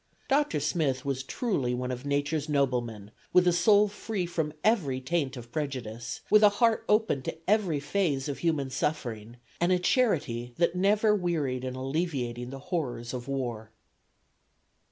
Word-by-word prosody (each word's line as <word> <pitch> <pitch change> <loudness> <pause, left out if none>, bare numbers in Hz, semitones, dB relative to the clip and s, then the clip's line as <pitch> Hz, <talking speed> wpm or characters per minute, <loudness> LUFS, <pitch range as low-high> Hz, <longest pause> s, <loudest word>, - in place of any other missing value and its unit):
Dr. 280 - +2
Smith 140 -3 0
was 135 -1 -1
truly 135 - -1
"one 125 +1 -3
of 125 +3 -5
Nature's 145 +2 -1
noblemen," 120 -7 -1 0.2
with 180 0 +6
a 175 - +5
soul 205 +4 +5
free 205 -2 -3
from 160 -3 -2
every 170 - +2
taint 140 -1 -1
of 120 -1 -10
prejudice, 120 -5 -4
with 215 - +7
a 210 - +8
heart 230 -2 +3
open 210 -10 +2
to - - -5
every 195 -7 +2
phase 145 -3 0
of 145 - -4
human 155 -6 0
suffering 120 -6 -3 0.2
and 175 +2 +2
a 180 - +4
charity 140 - 0
that 170 -1 +2
never 210 +3 +3
wearied 155 -10 -1
in 130 0 -4
alleviating 130 -4 -2
the 135 - -7 0.2
horrors 125 -8 -2
of 125 0 -5
war. 120 -5 -3
145 Hz, 155 wpm, -28 LUFS, 125-180 Hz, 0.2 s, a